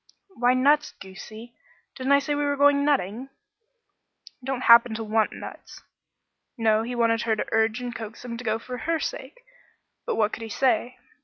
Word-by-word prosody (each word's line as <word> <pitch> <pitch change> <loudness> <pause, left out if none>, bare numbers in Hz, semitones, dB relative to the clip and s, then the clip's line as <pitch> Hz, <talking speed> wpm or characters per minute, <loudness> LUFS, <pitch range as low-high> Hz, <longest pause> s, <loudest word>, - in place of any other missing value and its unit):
"Why, 245 -2 +2
nuts, 290 +4 +2
goosey; 215 +5 -11 0.4
didn't 265 +1 +1
I - - +7
say 285 +1 -2
we 290 0 -1
were 285 0 0
going 285 0 +4
nutting?" 265 -3 -1 1.1
"I - - -14
don't 265 -1 -3
happen 235 -1 +6
to 225 - -4
want 220 0 +1
nuts." - - -11 0.7
No, 220 -1 +2
he 245 +2 -5
wanted 230 -1 +2
her 225 -2 0
to - - -3
urge 225 +2 +1
and 245 -1 -5
coax 225 +1 -9
him 235 -1 -5
to 245 - -8
go 220 -1 0
for 250 +2 -8
her 330 +6 -1
sake, - - -6 0.7
but - - -1
what 215 -1 +1
could - - -6
he 225 - -6
say? 250 +1 0
240 Hz, 185 wpm, -25 LUFS, 225-270 Hz, 1.1 s, I